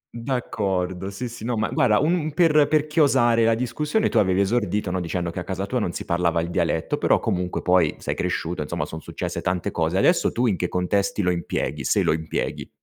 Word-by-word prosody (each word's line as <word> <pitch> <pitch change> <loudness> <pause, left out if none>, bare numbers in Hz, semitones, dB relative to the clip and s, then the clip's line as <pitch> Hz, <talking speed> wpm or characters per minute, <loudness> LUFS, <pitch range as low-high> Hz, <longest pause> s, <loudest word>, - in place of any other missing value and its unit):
D'accordo 95 -7 -2
sì, 110 +6 -5
sì. 120 -1 -9
No 120 0 -1
ma 110 - 0
guarda 105 -4 +3
un 155 +8 +2
un 155 -4 -1
per 155 -4 +4
per 155 -1 +2
chiosare 135 -7 +3
la 115 0 +3
discussione, 150 - 0
tu - - +2
avevi 95 -1 +2
esordito, 105 -2 0
no, 95 - -1
dicendo 85 0 -3
che 85 - -5
a - - -4
casa 95 +1 -3
tua 125 +5 -1
non 100 -6 -1
si - - -6
parlava 85 -1 +1
il 85 +1 -3
dialetto, - - 0
però - - +3
comunque 90 0 -2
poi 90 -4 +3
sei - - -3
cresciuto 85 -1 -2
insomma, 75 - -3
son 80 - -8
successe - - -5
tante 90 -1 -1
cose. 80 +2 0
Adesso 170 - +3
tu 120 - 0
in 110 -5 +2
che 90 +1 -2
contesti 100 +3 0
lo 90 - +2
impieghi, 80 -4 -3
se - - +2
lo - - +2
impieghi? 80 0 -3
100 Hz, 220 wpm, -23 LUFS, 90-120 Hz, -, per